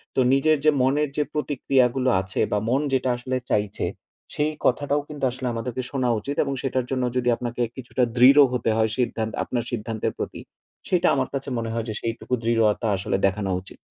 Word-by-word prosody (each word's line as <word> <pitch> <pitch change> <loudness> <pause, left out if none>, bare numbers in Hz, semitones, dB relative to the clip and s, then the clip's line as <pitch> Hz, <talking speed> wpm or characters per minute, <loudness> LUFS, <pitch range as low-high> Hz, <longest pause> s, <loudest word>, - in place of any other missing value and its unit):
তো - - +2
নিজের 155 +3 +3
যে 155 - +7
মনের 140 +3 +2
যে 150 - +3
প্রতিক্রিয়া 140 -3 +2
গুলো 130 -1 +1
আছে 95 -1 -5
বা 105 - +2
মন 135 +3 +2
যেটা 130 -1 +1
আসলে 130 +1 -2
চাইছে। 105 0 0 0.5
সেই 150 +1 0
কথাটাও 145 +3 +2
কিন্তু 145 -2 -8
আসলে 130 0 -5
আমাদেরকে 120 +2 -3
শোনা 130 -3 0
উচিত। 140 +6 -4
এবং 140 - -2
সেটার 130 -2 -1
জন্য 130 -1 0
যদি 125 -1 +1
আপনাকে 120 0 -4
কিছুটা 125 0 -2
দৃঢ় 135 +4 +8
হতে 120 -2 0
হয়, 110 0 +2
সিদ্ধা 120 -3 0 0.2
আপনার 120 -2 -2
সিদ্ধান্তের 110 -1 -2
প্রতি। - - -5 0.5
সেটা 180 -2 +3
আমার 130 -1 0
কাছে 135 0 -3
মনে 115 -1 -3
হয় 115 -1 -2
যে, 110 - -2
সেইটুকু 115 +2 -4
দৃঢ়তা 115 0 +2
আসলে 95 - -1
দেখানো 100 0 0
উচিত। - - -12
125 Hz, 190 wpm, -24 LUFS, 115-135 Hz, 0.5 s, দৃঢ়